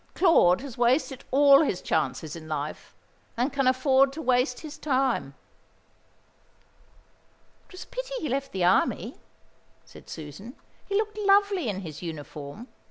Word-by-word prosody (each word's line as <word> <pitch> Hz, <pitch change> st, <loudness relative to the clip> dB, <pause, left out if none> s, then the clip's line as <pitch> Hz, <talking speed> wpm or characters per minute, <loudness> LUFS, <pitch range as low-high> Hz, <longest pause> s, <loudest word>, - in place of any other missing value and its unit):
Claude 255 Hz, -, +4 dB
has 265 Hz, -3 st, -9 dB
wasted 255 Hz, +2 st, +1 dB
all 280 Hz, +1 st, +6 dB
his 200 Hz, -, 0 dB
chances 160 Hz, -1 st, -2 dB
in 160 Hz, -1 st, -10 dB
life, 150 Hz, -1 st, -5 dB, 0.4 s
and 255 Hz, +4 st, 0 dB
can 275 Hz, -2 st, +1 dB
afford 265 Hz, +1 st, +3 dB
to 290 Hz, -, -9 dB
waste 250 Hz, -2 st, +1 dB
his 310 Hz, 0 st, -9 dB
time." 260 Hz, -, 0 dB, 2.3 s
"It -, -, -19 dB
was 370 Hz, -, -8 dB
a -, -, -21 dB
pity -, -, -6 dB
he 310 Hz, -, -3 dB
left 275 Hz, +1 st, -2 dB
the 190 Hz, -2 st, -2 dB
Army," 175 Hz, -, +1 dB, 0.7 s
said -, -, -15 dB
Susan. 160 Hz, -, -9 dB, 0.3 s
"He 400 Hz, -, -1 dB
looked 430 Hz, 0 st, -1 dB
lovely 400 Hz, -, +3 dB
in 195 Hz, -1 st, -4 dB
his 155 Hz, -5 st, -8 dB
uniform. 155 Hz, -, -8 dB
255 Hz, 145 wpm, -26 LUFS, -, 2.3 s, all